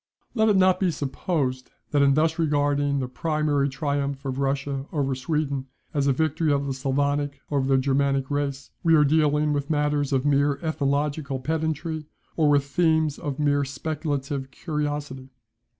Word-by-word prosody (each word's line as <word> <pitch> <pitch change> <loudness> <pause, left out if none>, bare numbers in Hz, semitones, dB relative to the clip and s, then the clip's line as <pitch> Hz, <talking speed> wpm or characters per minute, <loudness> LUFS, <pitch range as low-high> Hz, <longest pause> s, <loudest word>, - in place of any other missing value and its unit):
] - - -44
Let 220 -2 +3
it 210 - +4
not 185 -1 +4
be 190 - +2
supposed 140 -3 -2 0.2
that 145 - +3
in 140 -1 +4
thus 160 +2 +1
regarding 145 -2 +1
the 130 -2 -1
primary 150 0 0
triumph 140 0 -2
of 135 0 -3
Russia 140 0 -1
over 140 -3 0
Sweden 140 0 -2 0.3
as 140 -2 +1
a - - +4
victory 155 +2 +1
of 140 0 +1
the 135 - -2
Sclavonic 140 +1 -1
over 140 -2 +1
the 135 -1 +4
Germanic 135 0 +1
race, 140 -1 -2
we 165 -1 +4
are 150 - +6
dealing 150 0 +2
with 145 0 -2
matters 150 -2 +1
of 135 0 +1
mere 140 0 +2
ethnological 145 -2 -1
pedantry, 160 +1 -2 0.3
or 155 -3 +3
with 145 -1 +3
themes 160 0 +1
of 145 -2 -4
mere 145 -1 +2
speculative 140 -1 -3
curiosity. 145 -3 -4
145 Hz, 165 wpm, -25 LUFS, 140-155 Hz, 0.3 s, are